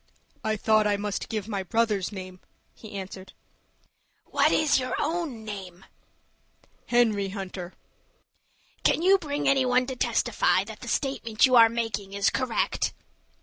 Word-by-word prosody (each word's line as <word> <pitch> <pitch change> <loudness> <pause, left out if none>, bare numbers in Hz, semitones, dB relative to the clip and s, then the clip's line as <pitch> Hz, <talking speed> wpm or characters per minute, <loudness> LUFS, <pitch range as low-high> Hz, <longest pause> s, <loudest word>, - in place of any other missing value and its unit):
"I 220 -1 0
thought 215 0 +3
I 205 -1 +1
must 205 0 -4
give 215 -2 -3
my 200 -3 -2
brother's 210 -1 0
name," 185 -2 -8 0.3
he 220 -1 -12
answered. 190 -1 -8 0.9
"What - - +2
is 305 -3 +3
your 255 0 -2
own 310 -8 -2
name?" 190 -4 -8 1.0
"Henry 220 -5 +2
Hunter." 190 -2 -6 1.1
"Can 330 - +2
you 385 +2 +5
bring 290 -3 -3
any 275 -1 +4
one 250 0 +2
to 260 0 -5
testify - - +1
that - - -10
the - - -10
statement 250 -6 +1
you 255 -1 +3
are 230 -1 +8
making 215 -4 -3
is 200 0 +2
correct?" 255 -3 -1
220 Hz, 145 wpm, -26 LUFS, 195-255 Hz, 1.1 s, are